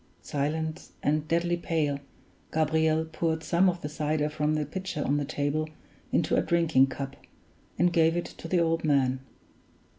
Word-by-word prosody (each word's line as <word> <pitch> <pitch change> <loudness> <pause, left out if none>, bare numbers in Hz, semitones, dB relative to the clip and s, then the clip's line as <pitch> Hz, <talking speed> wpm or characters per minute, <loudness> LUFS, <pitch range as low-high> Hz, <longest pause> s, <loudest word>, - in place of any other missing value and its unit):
Silent 155 +2 -2
and 150 +1 +1
deadly 170 +1 +1
pale, 155 -4 -1 0.5
Gabriel 160 0 +2
poured 160 0 -1
some 180 +3 +4
of 175 -1 -4
the - - -1
cider 150 0 0
from 150 0 0
the 150 -1 0
pitcher 185 0 -4
on 145 - +2
the 145 - -1
table 145 +3 -1 0.4
into - - +2
a - - +4
drinking 165 -6 +3
cup, 135 0 -5 0.6
and 175 -1 +3
gave 165 0 +4
it 175 - -1
to - - -9
the 180 +1 +2
old 165 0 +1
man. 135 -4 +2
155 Hz, 160 wpm, -28 LUFS, 145-165 Hz, 0.6 s, some